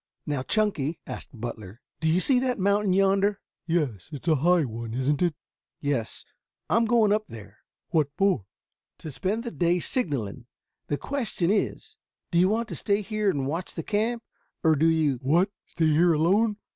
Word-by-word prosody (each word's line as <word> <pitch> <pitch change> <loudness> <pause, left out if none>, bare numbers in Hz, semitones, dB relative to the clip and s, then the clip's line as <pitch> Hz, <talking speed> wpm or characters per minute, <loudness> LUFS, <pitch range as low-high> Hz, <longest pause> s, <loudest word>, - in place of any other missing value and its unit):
"Now, 145 -3 -1
Chunky," 170 -4 0
asked - - -7
Butler, 115 -4 -7 0.2
"do 160 - +1
you 165 +3 +3
see 255 +6 +4
that 250 -1 0
mountain 200 0 +2
yonder?" 195 +1 +3 0.3
"Yes. 150 - -1
It's 145 +2 -8
a 160 -2 +4
high 170 +2 +3
one, 115 -1 -6
isn't 135 +4 0
it?" 175 -4 +2 0.4
"Yes. 140 -6 -2 0.5
I - - +4
am 230 - +3
going 220 -3 +4
up 215 0 -1
there." 110 -3 -12 0.3
"What 155 -3 +2
for?" 190 - +2 0.5
"To 155 - -8
spend 190 - -2
the 235 - -5
day 175 -2 +1
signaling. 130 - -3 0.4
The 145 - -1
question 225 - -1
is, 210 - -2 0.3
do 170 - +3
you 185 +2 +5
want 225 +2 0
to - - -4
stay 205 0 0
here 215 0 0
and 140 -7 -1
watch 165 +6 -4
the 165 - -4
camp, 225 +5 -1 0.4
or 160 -2 +5
do 155 +3 +3
you 155 -5 +2
" - - -34
"What! 170 +9 +2 0.2
Stay 165 - -1
here 165 +3 +4
alone? 200 +8 +2
170 Hz, 185 wpm, -26 LUFS, 145-205 Hz, 0.5 s, you